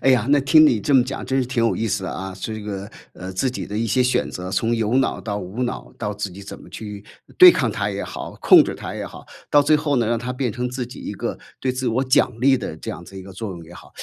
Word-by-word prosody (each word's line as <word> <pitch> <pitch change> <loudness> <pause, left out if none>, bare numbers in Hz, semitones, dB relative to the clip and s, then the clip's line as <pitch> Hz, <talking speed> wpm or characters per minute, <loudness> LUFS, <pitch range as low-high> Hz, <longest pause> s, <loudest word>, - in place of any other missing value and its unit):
哎 135 - +4
呀， 120 -4 +3
那 145 +1 +5
听 155 +4 +6
你 120 -7 +3
这 140 +7 0
么 130 - +7
讲 135 +2 -5
真 135 - 0
是 125 - -1
挺 125 -2 -1
有 115 - +2
意 115 - -2
思 100 -2 -1
的， - - -3
啊。 95 0 -6
这 110 +3 -5
个， 100 -1 -6 0.2
呃， 95 +1 -7
自 125 +8 0
己 125 - -5
的 105 - -4
一 115 - 0
些 125 +4 +2
选 125 0 +1
择， 90 +1 -6
从 115 +5 0
有 115 +1 0
脑 135 - 0
到 105 -2 -3
无 100 +6 -5
脑， 120 - -4
到 105 -2 -2
自 100 -1 -4
己 95 +3 -11
怎 100 - -9
么 - - -14
去 105 -2 -8 0.4
对 365 -1 +11
抗 - - 0
它 - - -1
也 - - -4
好、 - - -7
控 - - +8
制 - - -4
它 - - -7
也 - - -5
好。 - - -11 0.3
到 145 - +6
最 150 +2 +4
后 150 -2 +1
呢， 120 -2 +2
让 115 +1 +1
它 125 +2 -4
变 125 -3 -1
成 125 +2 -3
自 125 0 -4
己 125 - -11
一 - - -5
个 - - -4 0.2
对 130 - 0
自 130 0 -2
我 130 +4 0
奖 130 -1 +3
励 135 0 +5
的 95 -8 -6
这 - - -6
样 - - -7
子 95 +2 -11
一 - - -8
个 95 +1 -11
作 100 +3 -5
用 85 -2 -10
也 85 - -14
好。 - - -14
115 Hz, 320 characters per minute, -22 LUFS, 100-130 Hz, 0.4 s, 对